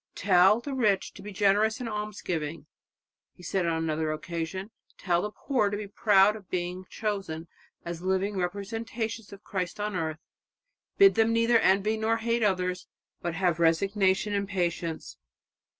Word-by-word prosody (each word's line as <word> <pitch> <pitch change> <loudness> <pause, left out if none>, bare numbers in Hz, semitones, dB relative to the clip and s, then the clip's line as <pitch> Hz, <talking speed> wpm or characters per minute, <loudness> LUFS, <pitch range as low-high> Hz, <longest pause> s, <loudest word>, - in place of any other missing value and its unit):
"Tell 190 +2 +5
the 280 +2 -5
rich 210 -7 +1
to - - -12
be 210 +1 -8
generous 205 +3 +2
in 250 - -4
almsgiving," 175 -8 -4 0.7
he 180 - -16
said 185 -1 -1
on 165 -1 0
another 155 -1 -1
occasion; 170 +6 -4 0.3
"tell 175 -2 +1
the 210 - -2
poor 230 -1 0
to 205 - -3
be 210 - -5
proud 200 0 +4
of 205 -4 -12
being 180 +1 -3
chosen 195 -7 -4 0.4
as 170 -1 -5
the 185 - -6
living 190 +2 0
representatives 220 +4 -4
of 200 +1 -12
Christ 185 -1 -4
on 210 -1 -2
earth. 160 -3 -2 0.8
Bid 395 -1 +7
them 225 0 +3
neither 230 0 +4
envy 205 +2 +2
nor 220 +1 +1
hate 230 +1 0
others, 180 -3 0 0.3
but 170 -1 -3
have 175 -2 +1
resignation 190 +4 +2
and 200 -1 -1
patience." 170 -3 -3
195 Hz, 160 wpm, -28 LUFS, 175-215 Hz, 0.8 s, Bid